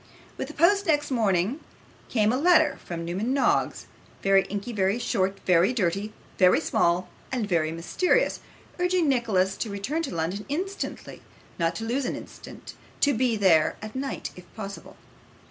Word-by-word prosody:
With - - -4
the - - -10
post 400 +4 +3
next 295 -2 +1
morning 215 - +1 0.5
came 215 -1 +2
a 255 - 0
letter 315 -3 +4
from 170 -1 -5
Newman 200 +10 -1
Noggs, 275 - +1 0.4
very 195 0 +4
inky, 205 +4 -5
very 195 +1 +1
short, 195 -4 -1
very 180 +5 +4
dirty, 200 -1 -1 0.3
very 180 -1 +6
small, 175 +2 +1 0.2
and 245 -5 -1
very 165 -4 +1
mysterious, 345 - +1 0.4
urging 360 -2 +2
Nicholas 210 -8 +1
to 225 - -3
return 205 +11 -2
to 275 - -4
London 170 +6 -2
instantly; 380 +7 -4 0.4
not 165 0 +1
to 225 - -5
lose 255 +4 -1
an - - -2
instant; - - -10 0.3
to 285 - +3
be 240 -1 +1
there 165 -6 +4
that 215 +2 -8
night 270 +1 -4
if 180 -1 -14
possible. 200 -2 -8
215 Hz, 160 wpm, -26 LUFS, 185-275 Hz, 0.5 s, very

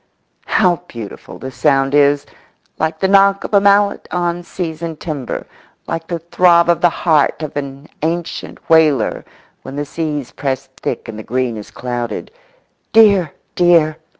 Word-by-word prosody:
How 180 -5 +3
beautiful 115 -4 -9
the 130 - -7
sound 135 0 +1
is! 145 0 +3 0.5
like 160 0 -1
the 190 - +3
knock 195 0 +4
of - - -7
a 200 - +6
mallet 200 0 +3
on 175 -1 -1
seasoned 165 -2 -5
timber, 145 -7 -5 0.4
like 165 0 -4
the 175 -2 -2
throb 170 +1 +3
of 170 - +3
the 175 - +5
heart 155 -2 +1
of 150 - -6
an 140 0 -6
ancient 165 +2 -4
whaler 155 -6 +3 0.4
when 135 - -9
the 145 +1 -3
seas 150 -3 -4
press 135 -2 -3
thick - - -3
and 110 -1 -7
the - - -7
green 125 0 -1
is 105 -1 -8
clouded. 120 -3 -5 0.6
"Dear, 200 -8 +5 0.2
dear!" 165 -3 +3
160 Hz, 150 wpm, -17 LUFS, 140-175 Hz, 0.6 s, a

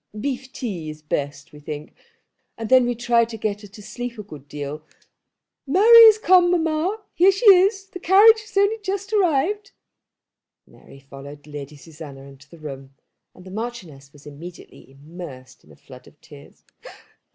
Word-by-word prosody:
Beef 260 +1 -5
tea 185 -13 -6
is 155 0 -11
best, 145 -1 -5
we 150 - -13
think; 150 0 -8 0.6
and 225 -2 -6
then 255 -1 +5
we 245 - -2
try 235 0 +2
to 225 0 -6
get 210 -1 -3
her 205 - -12
to 205 +1 -15
sleep 240 +3 -7
a 210 - -7
good 150 -8 -13
deal. 145 +1 -7 0.9
Mary 450 - +8
has 435 -1 +7
come, 365 -4 +4
mamma. 345 +5 -1
Here 370 +3 +5
she 390 +5 -4
is. 390 0 +5
The 370 -1 -11
carriage 425 +6 +5
has 430 -1 -11
only 405 +3 +2
just 400 0 -5
arrived." 395 +2 0 0.9
Mary 135 - -18
followed 140 +2 -12
Lady 145 -1 -9
Susanna 150 -3 -12
into 135 0 -16
the 170 - -15
room, 135 -3 -10 0.4
and 180 - -16
the 185 - -11
Marchioness 185 - -8
was 145 0 -19
immediately 155 +1 -13
immersed 140 -2 -12
in - - -21
a - - -17
flood 125 -2 -16
of 150 - -21
tears. 145 -1 -17
210 Hz, 170 wpm, -22 LUFS, -, 0.9 s, Mary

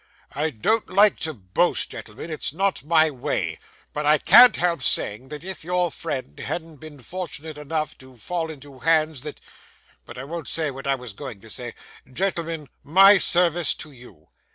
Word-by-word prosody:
I 150 +3 -1
don't 210 - -1
like 205 +1 +4
to 160 -1 -3
boast, 100 - 0
gentlemen; 110 +9 -9
it's 155 - -2
not 195 0 -1
my 160 0 +4
way; 130 -3 -3 0.3
but 150 - -3
I 150 +1 +4
can't 240 +8 +7
help 170 -4 0
saying, 115 0 +3
that, 150 0 -8
if 190 -2 -8
your 180 0 0
friend 130 - -6
hadn't 165 -2 -5
been 150 -2 -12
fortunate 160 0 -7
enough 155 0 -4
to 130 -1 -16
fall 165 +8 -3
into 140 -3 -11
hands 160 -3 +1
that 150 +1 -8 0.7
But 120 - -11
I 130 - -6
won't 165 +2 -7
say 155 -3 -1
what 135 +1 -8
I 135 - +2
was 125 -5 -9
going 125 -2 -9
to 115 - -13
say. 120 -2 -6 0.4
Gentlemen, 165 -2 -3 0.2
my 195 +6 +6
service 175 -2 +4
to 155 - -9
you. 120 - -17
155 Hz, 175 wpm, -23 LUFS, 130-170 Hz, 0.7 s, can't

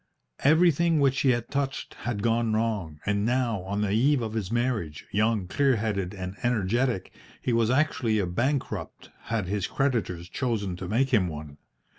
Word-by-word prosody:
Everything 165 +1 +4
which 135 -2 +3
he 135 - +3
had 120 -1 0
touched 140 -1 -2
had 110 -4 -4
gone 115 -1 +2
wrong, 105 -9 -1
and 105 0 +1
now, 120 -3 +1
on 100 +3 -3
the 105 -2 0
eve 130 +7 +3
of 110 -1 -4
his 105 -3 -3
marriage, 115 - -1
young, 110 -1 +1
clear 135 +6 +2
headed, 105 -4 -2
and 95 0 -5
energetic, 120 -1 0 0.3
he 125 - -1
was 115 -1 +3
actually 130 -5 +2
a 100 - +1
bankrupt 125 +10 -2
had 115 -4 -1
his 100 +1 -1
creditors 115 -11 -1
chosen 105 -5 -2
to 90 0 -6
make 125 +7 +1
him 105 -7 +3
one. 75 -3 -8
115 Hz, 170 wpm, -27 LUFS, 100-130 Hz, 0.3 s, Everything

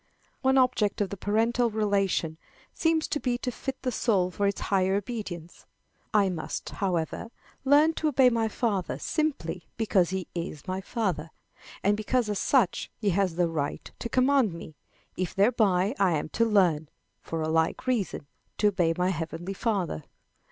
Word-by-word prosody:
One 265 0 +3
object 250 -6 +2
of 205 -3 -1
the - - -3
parental 230 +5 +1
relation 195 -6 0 0.3
seems 325 -1 +1
to 295 - -1
be 245 -3 0
to 250 - -3
fit 270 +2 -5
the 255 - 0
soul 195 -6 +1
for 200 +3 0
this 200 - -4
higher 190 -1 +2
obedience. 195 -6 -5 0.4
I 205 -3 +4
must, 175 -4 -4
however, 180 +2 -2 0.4
learn 295 +4 +5
to 315 - -1
obey 265 -3 +5
my 230 -1 +1
father 200 - -1
simply 185 - -2
because 200 -6 +2
he 190 -1 -2
is 170 -4 -5
my 185 +1 -2
father, 185 -8 -2 0.5
and 205 +1 +3
because 215 +2 0
as 205 - -1
such 250 -10 +2
he 205 -3 +1
has 185 -2 +1
the 175 0 +2
right 155 -4 -3
to 235 - -4
command 255 -5 +3
me, 165 -1 -9 0.4
if 185 -2 -2
thereby 200 -2 +3
I 190 -3 +4
am 155 0 -2
to 230 +8 +2
learn, 175 -8 +3 0.3
for 165 -1 -3
a - - -1
like 160 +1 +1
reason, 225 - -1 0.3
to 210 - +4
obey 170 -4 +1
my 180 +1 +2
heavenly 170 +1 -4
Father. 190 - -1
200 Hz, 165 wpm, -27 LUFS, 175-235 Hz, 0.5 s, learn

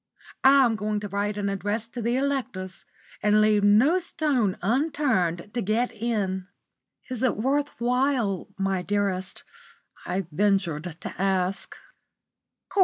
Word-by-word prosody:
I'm 265 -4 +6
going 210 0 -2
to 210 - -4
write 205 +1 -2
an 205 -1 -1
address 205 +3 -2
to 240 0 -6
the 235 +2 0
electors, 255 -10 -3 0.4
and 210 0 +4
leave 215 -1 +4
no 235 - +5
stone 270 - 0
unturned 225 - 0
to 240 - -1
get 225 +5 0
in." 200 -5 -2 0.6
"Is 250 - -4
it 255 -2 +1
worth 280 +6 -1
while, 245 -5 +1
my 195 -1 0
dearest?" 195 -1 -2 0.6
I 190 0 -1
ventured 175 -3 0
to - - -6
ask. 190 -1 -1
210 Hz, 125 wpm, -26 LUFS, 195-250 Hz, 0.6 s, I'm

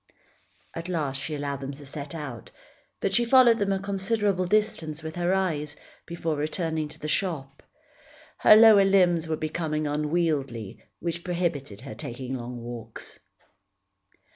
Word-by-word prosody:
At 165 +2 -6
last 145 -6 -2
she 155 +1 -3
allowed 140 -1 -3
them 135 +1 -5
to 145 +1 -12
set 140 +2 -6
out, 130 - -7 0.5
but 195 - 0
she 235 - +4
followed 235 -1 +6
them 200 -1 +1
a 195 - +2
considerable 200 -1 0
distance 180 -6 0
with 160 0 -6
her 175 0 0
eyes, 155 -6 0 0.3
before 165 -2 -2
returning 155 +1 -1
to 150 - -11
the 150 - -5
shop. 150 -6 -2 0.8
Her - - +8
lower 215 -2 +8
limbs 180 -4 +3
were 160 -1 -1
becoming 155 -1 -2
unwieldy 150 - -1 0.2
which 170 0 -3
prohibited 165 - -2
her 130 -4 -8
taking 125 +3 -6
long 125 -1 -5
walks. 120 -1 -7
160 Hz, 145 wpm, -26 LUFS, 140-185 Hz, 0.8 s, Her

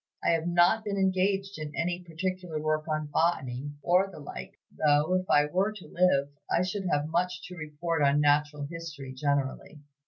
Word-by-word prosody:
I - - +2
have 165 0 +1
not 175 +5 +4
been 205 -2 -2
engaged 195 0 +1
in 150 -1 -6
any 175 +2 -1
particular 175 -1 -4
work 155 0 -1
on 155 -1 -1
Botany, 145 -4 0
or 185 +3 +3
the - - -11
like, 145 - -8 0.2
though, 150 +3 +3
if 185 0 0
I 145 0 +5
were 185 +7 +1
to 210 -4 -11
live, 155 -6 +2 0.2
I 175 - +3
should 185 +1 -3
have 145 -3 +1
much 175 +3 -1
to 180 - -8
report 160 +1 -3
on 140 0 +4
Natural 145 0 +2
History 150 -4 -7
generally. 140 +1 -2
165 Hz, 180 wpm, -28 LUFS, 145-180 Hz, 0.2 s, I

